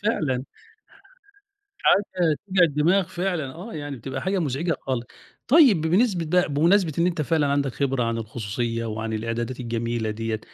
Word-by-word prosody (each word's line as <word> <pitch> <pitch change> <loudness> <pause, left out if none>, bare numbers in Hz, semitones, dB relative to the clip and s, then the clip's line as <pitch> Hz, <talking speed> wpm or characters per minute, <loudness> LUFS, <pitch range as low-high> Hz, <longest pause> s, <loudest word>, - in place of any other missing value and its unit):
فعلًا. 145 - 0 1.4
حاجة 180 -6 +3
توجع 190 -2 +3
الدماغ 165 +5 +3
فعلًا 175 -7 -3
آه، 190 +8 -9
يعني 145 -2 -5
بتبقى 130 +3 -6
حاجة 190 +1 0
مزعجة 160 +1 -1
خالص 125 -3 -3 0.4
طيب 260 - +6
ب 160 - -1
بنسبة 185 -1 +2
بقى 180 +2 +2
بمناسبة 165 +4 +3
إن 170 - +3
أنت 165 -4 0
فعلًا 155 -1 +1
عندك 140 -2 0
خبرة 135 -2 0
عن 115 0 -1
الخصوصية 115 +1 -3
وعن 110 +1 -4
الإعدادات 115 +3 -3
الجميلة 115 -1 -2
ديّة، 110 0 -3
145 Hz, 155 wpm, -24 LUFS, 120-175 Hz, 1.4 s, طيب